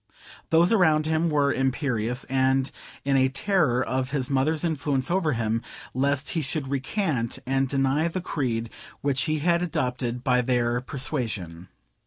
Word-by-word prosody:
Those 170 +5 +4
around 160 -7 +4
him 160 +1 +1
were 145 -2 +2
imperious, 125 -2 -1
and 130 0 +1 0.3
in 140 -1 +2
a 130 0 +4
terror 135 -5 +1
of 130 0 -1
his 135 -2 -2
mother's 150 +4 +1
influence 145 -4 -1
over 175 -5 +2
him, 115 -1 0 0.3
lest 140 +1 0
he 165 - 0
should 140 -1 -3
recant, 140 - -1
and 135 0 +1
deny 135 +4 +2
the 170 +2 -3
creed 120 -10 -2 0.3
which 140 +1 +1
he 155 -1 0
had 170 -1 +3
adopted 125 -7 -2
by 125 -1 +3
their 120 -1 +1
persuasion. 115 - -3
135 Hz, 150 wpm, -25 LUFS, 125-155 Hz, 0.3 s, Those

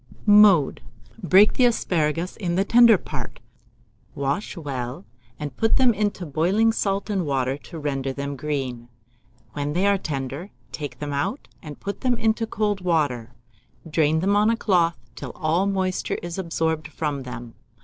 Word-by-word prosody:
Mode. 205 -8 +6 0.4
Break 190 +4 +5
the 255 - +3
asparagus 170 -7 0
in 175 -5 -2
the 195 +2 +2
tender 235 -1 +7
part, - - -7 0.8
wash 140 +9 -2
well, 135 +1 -5 0.3
and 145 -3 -6
put 225 +8 +2
them 255 -3 +4
into 205 -3 -2
boiling 185 +10 +2
salt 200 -2 -1
and 195 -3 0
water 135 -3 0
to 165 - -11
render 135 -3 -2
them 140 +1 -4
green. 130 -5 -4 0.6
When 145 0 -3
they 180 +4 +1
are 200 -1 +3
tender, 140 +3 -4 0.2
take 145 -5 -6
them 145 +1 -5
out, 195 - -2
and 150 -2 -9
put 200 - -5
them 250 -2 +1
into 225 0 0
cold 210 -3 -1
water; 135 -9 0 0.5
drain 160 0 +2
them 200 +2 +2
on 210 +1 +4
a 230 - +1
cloth 175 -6 +2 0.2
till - - -7
all 170 +4 +1
moisture 190 -2 -1
is 175 +2 -5
absorbed 160 -3 -1
from 150 -2 -3
them. 120 -2 -8
165 Hz, 160 wpm, -23 LUFS, 145-200 Hz, 0.8 s, tender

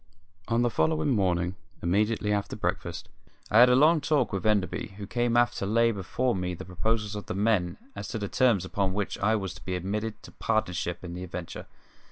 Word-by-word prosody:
On 115 +1 +2
the 120 - +1
following 155 +2 +1
morning, 90 -6 +1 0.3
immediately 105 +4 +1
after 100 -1 -2
breakfast, - - -3 0.4
I 110 - +6
had 125 +1 +9
a 125 - +5
long 155 +4 +5
talk 145 -6 +1
with 95 +2 -1
Enderby, 100 -1 0
who 100 - -6
came 120 +2 0
aft 120 0 +3
to 100 - -2
lay 115 +2 +3
before 115 +5 -1
me 90 -1 -2
the - - -8
proposals 105 +4 -1
of 105 - -6
the - - -3
men 100 -4 +1 0.2
as - - -5
to - - -4
the 100 -2 -3
terms 115 -6 +2
upon 95 0 -1
which 105 -1 -2
I 110 +2 +3
was 95 -4 -3
to - - -13
be 95 - -3
admitted 105 +4 -3
to - - -11
partnership 90 -5 -1
in 85 -1 -6
the 90 +1 -6
adventure. 90 -1 -7
105 Hz, 210 wpm, -28 LUFS, 95-115 Hz, 0.4 s, had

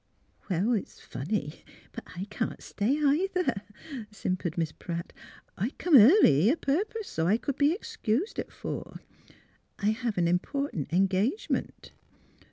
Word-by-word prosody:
'' - - -33
Well, 195 +6 +1
it's 215 - -3
funny, 150 0 -4 0.3
but - - -8
I 180 +2 -4
can't - - -3
stay, 230 +8 0
either," 310 - +1 0.5
simpered 185 -5 -3
Miss 165 -2 0
Pratt. 170 +1 -6
'^ - - -21 0.3
I 210 +6 -1
come 345 -3 +3
early 225 - +7
a 305 - +2
purpose 405 +10 -1
so 160 0 -1
I 205 +5 +4
c'd 275 +3 -3
be 290 +1 +4
excused 325 - -2
at - - -5
four. - - -6 0.8
I 210 +1 +2
have 230 -2 -2
an 170 -1 +3
important 180 - -1
engagement. 195 - 0
215 Hz, 145 wpm, -28 LUFS, 180-285 Hz, 0.8 s, early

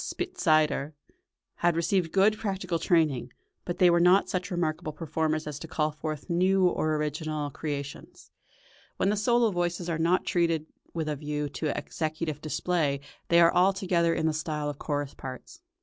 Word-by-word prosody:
Spitzeder, 155 - +1 0.6
had 175 -1 +2
received 170 0 +1
good 200 +4 +4
practical 190 -5 -2
training, 155 -8 +1 0.3
but 175 - -3
they 180 -1 +6
were 170 - +4
not 180 +3 +5
such 185 +1 -2
remarkable 160 -4 -2
performers 155 0 -1
as 150 -1 -5
to 165 - -8
call 155 -1 0
forth 155 -1 -5
new 185 +2 +3
or 155 -3 0
original 150 0 -2
creations. 140 -1 -6 0.7
When 195 - +2
the - - +1
solo 235 +1 +3
voices 175 -1 -2
are 165 -1 -1
not 170 +3 +2
treated 165 -3 +1 0.3
with 160 -2 -3
a 150 -1 -2
view 150 0 -3
to 155 +2 -3
executive 155 -1 -3
display 155 -2 0 0.3
they 170 - +5
are 170 - +6
altogether 180 -3 +2
in - - -1
the 160 - +2
style 150 -1 -2
of 145 - -13
chorus 145 -2 -2
parts. 130 - -9
165 Hz, 165 wpm, -28 LUFS, 150-180 Hz, 0.7 s, they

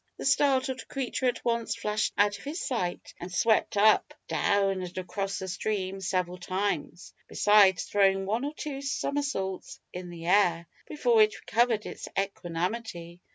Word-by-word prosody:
The - - -6
startled 270 -2 +2
creature 260 -1 -2
at 245 -1 -2
once 235 -1 0
flashed 210 +1 -1
out 205 0 +3
of - - -14
his 305 +5 -4
sight, 185 -9 -3
and 175 +1 -7
swept 215 +3 +2
up, 215 +1 +4
down, 195 -2 +1
and 180 0 -7
across 195 +2 -3
the 190 - -5
stream 190 +1 -3
several 180 -1 -1
times, 180 -2 -3
besides 205 -3 +5
throwing 195 -1 +2
one 220 +6 -1
or 290 +2 -3
two 280 -3 -5
somersaults 275 -9 -3
in 180 0 -6
the 170 -1 -9
air, 175 -3 +3 0.2
before 240 -7 +3
it 215 0 +3
recovered 230 -2 +1
its - - -7
equanimity. 180 -1 -3
200 Hz, 155 wpm, -28 LUFS, 185-235 Hz, 0.2 s, besides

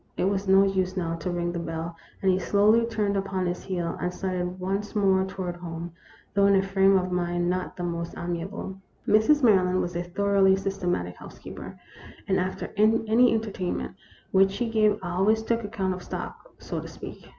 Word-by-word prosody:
It - - 0
was 195 +1 0
no 195 +1 +6
use, 190 -1 0
now, 165 -2 -1
to 175 - -4
ring 175 -1 -1
the 170 - -3
bell, 165 0 -4 0.3
and 190 - +5
he 185 - +1
slowly 215 +5 +3
turned 210 -3 0
upon 190 -1 -1
his 175 0 -2
heel, 175 -3 -3
and 180 - -1
started 180 -1 -3
once 195 +3 -3
more 190 -2 +3
toward 185 -2 -5
home, 170 -1 -6 0.4
though 200 -1 +4
in 200 - +5
a 190 - +3
frame 195 0 +4
of 185 0 -1
mind 175 0 0
not 185 0 -3
the 175 - -4
most 170 -1 -3
amiable. 175 +3 -5 0.3
Mrs. 260 +8 +4
Maryland 185 -5 +4
was 175 -1 -2
a 175 - 0
thoroughly 195 +2 +3
systematic 185 - -2
house - - -12
keeper, - - -9 0.5
and 190 -1 +2
after 185 +1 -3
any 225 +3 +4
entertainment 205 -5 -2 0.4
which 195 0 +5
she 225 +4 -3
gave 215 -2 +3
always 195 +5 +1
took 230 0 0
account 200 -3 -2
of 180 - -7
stock, - - -7
so - - -5
to - - -7
speak. - - -10
190 Hz, 190 wpm, -26 LUFS, 180-200 Hz, 0.5 s, no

